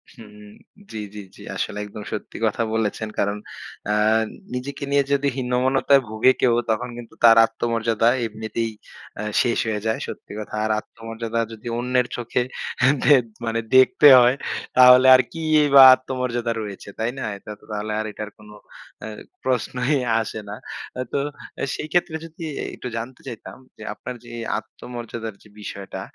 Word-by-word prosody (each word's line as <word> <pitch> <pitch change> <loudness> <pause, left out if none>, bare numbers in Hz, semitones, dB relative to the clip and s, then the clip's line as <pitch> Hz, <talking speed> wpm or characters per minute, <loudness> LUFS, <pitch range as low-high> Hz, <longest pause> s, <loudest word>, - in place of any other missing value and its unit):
হু, - - -12 0.7
জ্বি, 110 - -5 0.2
জি, - - -6 0.2
জি। - - -15
আসলে 105 - -3
একদম 105 +1 -9
সত্যি 105 - -6
কথা 110 +2 0
বলেছেন। 110 0 -1
কারণ 100 +1 0 0.5
আ - - +2 0.6
নিজেকে 135 +3 -5
নিয়ে 140 0 +4
যদি 140 0 +2
হীনমন্যতায় 130 +2 +2
ভোগে 110 +4 +4
কেউ 120 -2 +4 0.2
তখন 120 +3 0
কিন্তু 120 -1 -10
তার 115 -1 +8
আত্মমর্যাদা 115 0 0 0.2
এমনিতেই 110 +1 -3 0.5
আ - - -4 0.2
শেষ 120 -2 +1
হয়ে 105 -2 -2
যায়। 110 - 0
সত্যি - - -9
কথা। 105 - -8
আর 110 - 0
আত্মমর্যাদা 115 +1 -6
যদি 110 +1 -10
অন্যের 125 0 +1
চোখে 120 +1 -1 0.6
দে 145 - +7 0.3
মানে 115 0 -1 0.2
দেখতে 130 +3 +6
হয়, 125 +2 +5 0.4
তাহলে 125 +1 +8
আর 130 - +5
কি 165 - -7 0.3
বা 135 - +11
আত্মমর্যাদা 125 -2 -3
রয়েছে। 100 -1 -8
তাই 115 +2 0
না? - - -4
এটা 105 - -11
তো - - -20
তাহলে 105 +1 -3
আর 110 - -2
এটার 105 +1 -7
কোন 105 0 -16 0.5
অ্যা 110 - -6 0.3
প্রশ্নই 125 +2 0 0.3
আসে 110 0 -5
না। 105 - -5 0.6
তো - - 0 0.6
সেই 155 - -5
ক্ষেত্রে 175 -2 +1
যদি 165 +1 -11 0.3
একটু 125 - -7
জানতে 120 +3 -7
চাইতাম? 115 0 -8 0.2
যে - - -10
আপনার 125 - -8
যে 120 - -11 0.3
আত্মমর্যাদার 115 -2 -8
যে 105 - -18
বিষয়টা 100 -2 -7
115 Hz, 155 wpm, -22 LUFS, 110-125 Hz, 0.7 s, বা